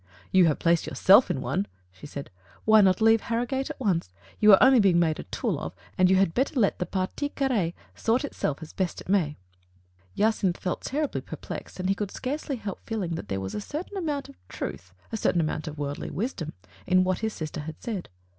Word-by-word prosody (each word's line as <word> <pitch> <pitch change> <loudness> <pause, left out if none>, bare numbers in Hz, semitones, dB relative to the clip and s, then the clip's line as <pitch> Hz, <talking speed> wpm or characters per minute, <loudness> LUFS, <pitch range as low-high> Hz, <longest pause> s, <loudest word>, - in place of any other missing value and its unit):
"You 185 -2 +6
have 150 - +2
placed 170 -1 +2
yourself - - +6
in - - -1
one/' 100 - -1 0.2
she 90 +10 -12
said. 140 -4 -7 0.3
"Why 220 0 +7
not 190 0 +4
leave 225 0 +5
Harrogate 245 +4 -1
at - - -7
once? 185 - 0 0.3
You 210 0 +7
are 195 - +10
only 260 -1 +7
being 195 -5 +5
made 160 -2 +2
a - - -6
tool - - -2
of, - - -6 0.2
and 185 0 +4
you 190 - +5
had 190 -3 +3
better 265 +1 0
let 200 - +2
the 180 - -2
partie 190 +9 -2
carr^e 235 -13 0 0.2
sort 240 +5 +1
itself 155 - -3
as 155 - -11
best 185 -3 -2
it - - -13
may." 165 -7 +2 0.8
Jacynth 205 -4 +2
felt 180 - -3
terribly 295 +1 -2
perplexed, - - -8
and 185 - -1
he 195 - +3
could 200 0 -3
scarcely 280 +4 -3
help 205 -5 -6
feeling 210 -7 -3
that 165 - -5
there 95 - -2
was 95 0 -5
a - - -3
certain 315 - -6
amount 300 -7 -2
of - - -14
truth 90 0 -6
— - - -31
a 225 - -2
certain 175 - +2
amount 155 0 -1
of 155 0 -6
worldly 145 0 -4
wisdom 185 - -3 0.2
— 95 +3 -24
in 185 0 +5
what 185 0 0
his 220 -1 -2
sister 155 0 -5
had 155 +1 -6
said. 210 -7 -5
190 Hz, 220 wpm, -27 LUFS, 165-230 Hz, 0.8 s, are